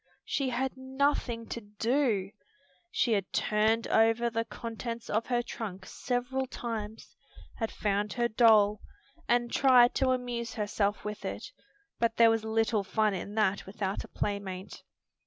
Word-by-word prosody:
She 275 -2 -1
had 260 +1 -1
nothing 260 -3 -1
to 235 - -4
do. 210 -1 0 0.6
She 240 -8 +1
had 200 -3 -1
turned 220 +2 +2
over 225 +1 +3
the 230 0 -1
contents 230 +1 -6
of 220 +2 0
her 240 -1 +1
trunk 195 -6 -6
several 260 +1 -2
times, 220 -3 -6 0.4
had 225 -2 -1
found 205 0 -1
her 240 -1 +1
doll, 215 -3 +5 0.5
and 240 0 +2
tried 250 -3 +6
to 265 -1 +1
amuse 245 -2 -2
herself 205 -1 -1
with 210 0 -5
it, - - -5 0.5
but 230 -1 +1
there 230 -1 +7
was 225 -1 0
little 220 -1 +1
fun 215 +2 +1
in 200 +3 -5
that 200 -3 +1
without 195 0 -3
a - - -11
playmate. 200 -2 -4
225 Hz, 145 wpm, -30 LUFS, 210-240 Hz, 0.6 s, there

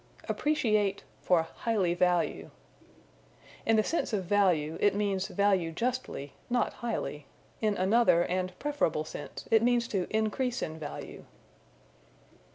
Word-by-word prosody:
Appreciate 215 -10 +1 0.2
for 175 -3 +3
Highly 190 0 -1
Value. 175 -1 +1 1.2
In 225 - +5
the 215 - +4
sense 330 -5 -1
of 200 -3 0
value, 170 -6 +2
it 205 - +4
means 200 -2 0
value 195 -5 +1
justly, 230 - -3 0.2
not 245 -2 +1
highly. 150 -11 -4 0.3
In 215 -2 +1
another 190 -2 +4
and 185 0 -2
preferable 285 - 0
sense - - -8
it 225 -1 +6
means 240 0 +2
to 190 -3 -1
increase 225 +4 0
in 160 0 -5
value. 145 -2 -7
200 Hz, 125 wpm, -30 LUFS, 175-230 Hz, 1.2 s, it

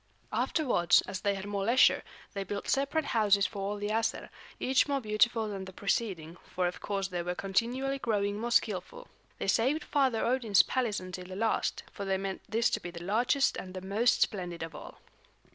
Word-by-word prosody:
Afterwards, 245 - +3
as 190 0 -6
they 200 0 +1
had 195 0 -6
more 200 -1 -2
leisure, 235 +5 +5 0.3
they 195 - -3
built 200 +1 -5
separate 280 +3 +1
houses 205 -5 +3
for 205 - -4
all 200 +1 -2
the 205 0 -3
Æsir, 225 +1 -1 0.3
each 265 +2 +3
more 280 -1 0
beautiful 220 0 +2
than 195 -2 -5
the 190 - -9
preceding, 185 -4 -2
for 180 0 -2
of 175 - -2
course 195 -2 -2
they 175 -2 -2
were 175 +1 -3
continually 245 +9 -1
growing 205 -4 0
more 235 +2 -2
skillful. - - 0 0.3
They - - -3
saved 260 +10 +2
Father 265 -6 +1
Odin's 235 -5 +4
palace 240 -5 -1
until 185 0 -7
the 185 +1 -8
last, 225 +3 0
for 200 - -6
they 195 0 +1
meant 195 0 -4
this 235 +2 +2
to - - 0
be 175 - -7
the 170 0 -8
largest 245 +8 +2
and 185 0 -7
the 185 - -5
most 215 +6 +3
splendid 175 -4 -4
of 165 -1 -7
all. 150 - -11
205 Hz, 195 wpm, -30 LUFS, 190-240 Hz, 0.3 s, leisure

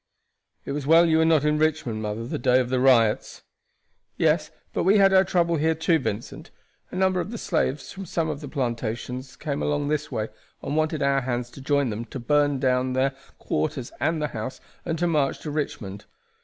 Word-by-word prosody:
"It - - -4
was 140 -1 -3
well 165 +2 +7
you 160 -1 +3
were 160 - +4
not 160 -3 +3
in 150 0 +2
Richmond, 155 -8 0
mother, 110 +2 -3
the - - -4
day 125 +1 +4
of 125 -1 -1
the 130 - +2
riots." 120 -5 +3 0.7
"Yes; - - +2 0.2
but - - 0
we 195 +4 +4
had 195 -1 +5
our 190 0 +7
trouble 170 -3 +1
here 160 +2 +2
too, 160 +1 +2
Vincent. 105 -3 -5 0.4
A - - -9
number 185 0 +2
of 185 - -3
the 230 - -5
slaves 150 -8 -1
from 195 -1 -8
some 165 0 -1
of 150 -1 -4
the 145 - -6
plantations 125 -1 -3
came 145 -2 -3
along 145 -1 0
this 150 0 -1
way, 110 0 -2 0.3
and 140 - -2
wanted 155 -1 0
our 140 0 +2
hands 120 -1 -3
to 135 - -11
join 140 -2 +1
them 110 +3 -4
to 130 - -7
burn 145 +3 +2
down 130 -1 +1
their 130 +1 +2 0.3
quarters 120 - -2
and 165 0 +1
the 150 -1 -1
house, 110 +3 -5 0.3
and 165 -1 -1
to 175 - 0
march 150 -5 +1
to 150 - -5
Richmond. 140 -10 -4
145 Hz, 210 wpm, -25 LUFS, 125-160 Hz, 0.7 s, well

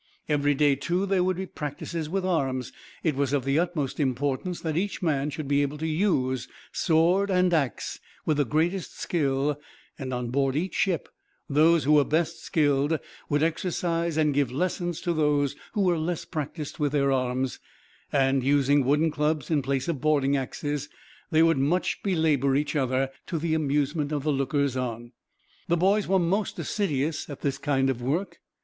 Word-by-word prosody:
Every 145 -1 +2
day, 145 0 +4
too, 175 +7 -1
there 195 -2 +2
would 185 -1 0
be 190 - -3
practices 155 0 -5
with 190 +2 -1
arms. 135 -8 -1 0.3
It 155 -4 +1
was 140 0 0
of 135 -3 0
the 135 +3 +2
utmost 170 -6 -2
importance 145 +5 -1
that 160 -2 -2
each 190 +2 -2
man 150 -3 +1
should 150 0 -5
be 140 0 +3
able 145 +1 -2
to 160 - -4
use 155 - 0 0.2
sword 175 +4 +2
and 180 -1 +3
axe 140 -8 -1 0.3
with 155 - +1
the 145 - +3
greatest 165 +8 -1
skill; 145 -2 0 0.4
and 130 -2 -4
on 125 -1 -3
board 135 0 +1
each 180 +5 -1
ship 180 -5 0 0.4
those 155 +3 +4
who 150 - +2
were 150 -1 +6
best 160 +3 -1
skilled 145 0 +2 0.3
would 145 +1 +2
exercise 165 0 -1
and 150 -2 +3
give 140 -3 +1
lessons 175 +3 -2
to 175 -2 0
those 145 -3 +1 0.2
who 210 - 0
were 180 -4 +2
less 165 +1 -2
practiced 150 0 -5
with 145 -1 0
their 140 -2 +2
arms; 130 0 -1 0.5
and, 135 -2 +2
using 140 +1 +3
wooden 150 +5 +2
clubs 150 -1 -1
in 150 -3 +3
place 135 +1 -1
of 165 -6 -2
boarding 145 -2 +2
axes, 145 +2 -3 0.4
they 160 -1 +4
would 165 -4 +3
much 160 +7 0
belabor 155 -8 +2
each 145 +2 0
other, 130 -1 +1 0.2
to 170 - -2
the 160 0 -1
amusement 150 0 0
of 145 -2 -1
the 150 -1 +1
lookers 140 0 0
on. 120 -2 -4 0.6
The 170 - +2
boys 195 +4 +2
were 190 - +3
most 190 +4 0
assiduous 155 -7 -1
at 145 - -8
this 140 -1 -1
kind 135 -2 +1
of 130 -2 -1
work. 155 +11 -2
150 Hz, 180 wpm, -26 LUFS, 135-165 Hz, 0.6 s, were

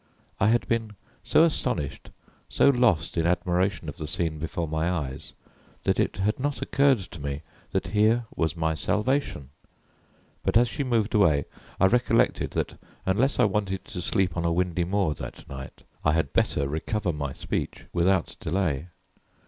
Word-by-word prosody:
I 105 - +4
had 120 +2 +2
been 115 -2 -1 0.3
so 160 - +5
astonished, 125 - -1 0.4
so - - +4
lost 115 - +2
in 85 0 +2
admiration 90 +1 0
of 75 - -6
the 75 - -5
scene 80 0 -1
before 80 +1 -3
my 80 +2 0
eyes, 75 -7 -4 0.5
that - - +1
it - - +1
had 105 +5 0
not 145 +1 -1
occurred 140 -1 +3
to 90 -5 -9
me 70 +2 -4 0.3
that - - -1
here 110 +3 +3
was 80 0 0
my 80 -1 +1
salvation. 105 - 0 0.9
But - - +3
as 120 +1 +4
she 140 - -3
moved 115 -5 0
away 80 -9 +4 0.3
I 95 - +5
recollected 115 +2 +2
that - - -2 0.3
unless 115 +9 +2
I - - +6
wanted 100 -2 0
to 90 - -6
sleep 90 -1 +1
on 85 - -1
a 85 - +1
windy 90 0 0
moor 95 -3 +1
that - - -9
night 65 -1 -9 0.2
I 75 - +3
had 80 -4 0
better 70 -2 +1
recover 85 +5 -2
my 70 -2 -3
speech - - -4
without 90 0 +2
delay. 85 -4 -1
90 Hz, 165 wpm, -26 LUFS, 80-110 Hz, 0.9 s, I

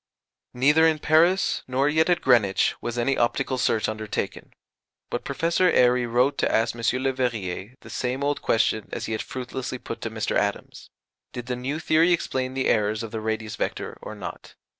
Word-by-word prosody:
Neither 150 +6 +5
in 160 -1 +2
Paris 165 +5 +3
nor 130 +2 +1
yet 160 +3 +2
at 175 - +2
Greenwich 110 -7 +3
was 120 0 -4
any 120 +3 +1
optical 130 +2 0
search 110 -3 +1
undertaken; 110 -1 -4 0.6
but - - -2
Professor 170 +2 +1
Airy 125 -3 +3
wrote 125 +4 +2
to - - +1
ask 115 +1 +2
M. 120 - -7 0.2
Leverrier 120 -5 -2
the - - -13
same 130 +2 -2
old 145 0 0
question 110 -2 +1
as - - -4
he - - -5
had 110 - -1
fruitlessly 130 0 -5
put 115 - -7
to 115 - -3
Mr. 110 -1 -2
Adams: 100 0 -2 0.4
Did 120 -1 -6
the 125 0 -2
new 130 +5 -3
theory 165 +2 +3
explain 130 -6 -2
the 135 - -1
errors 105 0 +1
of 110 - -7
the 110 - -4
radius 110 -1 -3
vector - - -3
or - - -7
not? - - -9
125 Hz, 180 wpm, -25 LUFS, 110-140 Hz, 0.6 s, Neither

